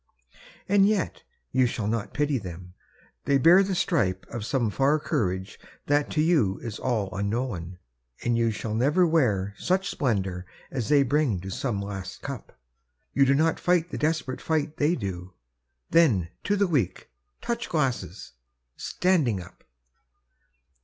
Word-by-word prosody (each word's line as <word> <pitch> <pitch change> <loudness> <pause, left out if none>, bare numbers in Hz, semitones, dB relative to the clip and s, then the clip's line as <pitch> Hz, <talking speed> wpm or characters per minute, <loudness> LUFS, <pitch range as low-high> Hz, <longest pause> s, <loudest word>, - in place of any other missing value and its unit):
And 200 0 +5
yet 205 -5 -1 0.3
you 130 -1 +3
shall 115 -3 -3
not 110 0 -2
pity 145 -2 0
them! 90 -2 -9 0.5
They 140 - +4
bear 170 +7 +7
The 195 -1 0
stripe 100 - 0
of 120 - -4
some 120 -2 0
far 140 +7 +3
courage 105 - -2 0.3
that 145 0 +2
to 155 - +1
you 150 - +2
Is 115 -3 -5
all 110 -7 -1
unknown 100 -4 -3 0.2
— - - -22
and 120 -1 +1
you 115 0 +2
shall 110 0 -4
never 145 +11 +3
wear 110 - +1
Such 185 0 +1
splendor 95 -8 -1 0.2
as 125 -3 -3
they 145 -2 +5
bring 135 -6 +1
to 95 +1 -6
some 115 -4 -2
last 95 -2 -7
eup; 135 -6 -5 0.7
You 140 - +4
do 140 - +4
not 160 +3 +2
fight 175 -1 +1
the - - -4
desperate 155 -4 -1
fight 155 -1 -1
they 155 +3 +2
do; 90 - -6 0.6
Then 115 - +4
— - - -46
^to 205 0 +1
the 200 - +3
Weak! 135 - -1 0.3
Touch 235 0 -3
glasses! 135 -6 -2 0.4
standing 155 - +1
up 90 -1 -13
130 Hz, 155 wpm, -26 LUFS, 100-155 Hz, 0.7 s, bear